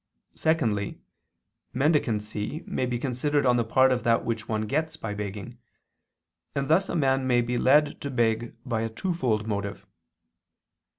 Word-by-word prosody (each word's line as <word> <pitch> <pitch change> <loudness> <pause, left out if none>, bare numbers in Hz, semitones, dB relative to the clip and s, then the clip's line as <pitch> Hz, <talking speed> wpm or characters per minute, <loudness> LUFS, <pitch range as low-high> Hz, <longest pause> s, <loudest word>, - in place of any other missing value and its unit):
Secondly, 115 -11 0 0.8
mendicancy 130 - 0
may 130 - -1
be 125 -1 -1
considered 140 +3 0
on 125 -1 +4
the 120 - +2
part 130 +4 +4
of 125 -1 +1
that 115 -1 +2
which 115 -1 -3
one 110 -1 0
gets 155 +9 -1
by 110 -2 -4
begging: 105 +3 -6 1.0
and 140 0 -1
thus 175 +5 +3
a - - -2
man 135 -4 +2
may 120 -1 +4
be 120 +1 -2
led 145 +4 +3
to 140 - -3
beg 120 -2 0
by 115 -4 -1
a 115 - -1
twofold 120 - -1
motive. 100 -2 -4
120 Hz, 155 wpm, -26 LUFS, 110-140 Hz, 1.0 s, on